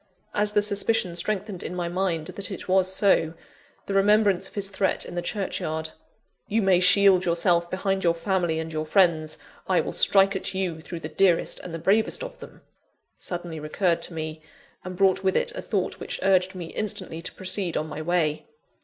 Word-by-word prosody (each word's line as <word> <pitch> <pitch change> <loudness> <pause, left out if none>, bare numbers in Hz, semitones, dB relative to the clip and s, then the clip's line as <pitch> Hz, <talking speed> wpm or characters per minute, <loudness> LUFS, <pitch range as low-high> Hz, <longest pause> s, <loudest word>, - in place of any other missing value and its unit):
As 210 0 0
the 210 -1 +3
suspicion 205 -3 0
strengthened 200 +1 -3
in 180 - -5
my 175 -1 -2
mind 175 -3 -1
that 195 +3 -2
it 195 - -7
was 185 0 +3
so, 190 -4 +2 0.5
the 200 - -4
remembrance 200 -1 +3
of - - -21
his 200 -1 0
threat 195 -1 0
in - - -8
the 175 - -2
churchyard: 160 -5 -3 0.6
"You 220 +1 +1
may 190 -2 +4
shield 190 0 +6
yourself 170 0 +2
behind 190 +1 -1
your 170 -1 +3
family 175 -2 0
and 160 0 -4
your 155 0 -3
friends: 160 -4 +2 0.3
I - - +3
will - - -2
strike 195 0 +4
at 190 - -3
you 180 -4 -2
through 165 +1 -7
the - - -4
dearest 185 -4 +2
and 180 - -8
the 165 - -4
bravest 200 +7 +1
of - - -8
them - - -13 0.3
" - - -49
suddenly 175 -3 -6
recurred 170 +3 0
to 170 0 -5
me; 155 0 -5 0.4
and 185 0 -6
brought 195 0 +3
with 190 0 +2
it 485 - 0
a - - -5
thought - - -2
which - - -5
urged 190 0 +2
me 175 -3 -7
instantly 190 -5 -3
to - - -5
proceed 185 -2 -2
on 155 - -1
my 155 0 -6
way. 160 -2 0
185 Hz, 200 wpm, -25 LUFS, 170-195 Hz, 0.6 s, shield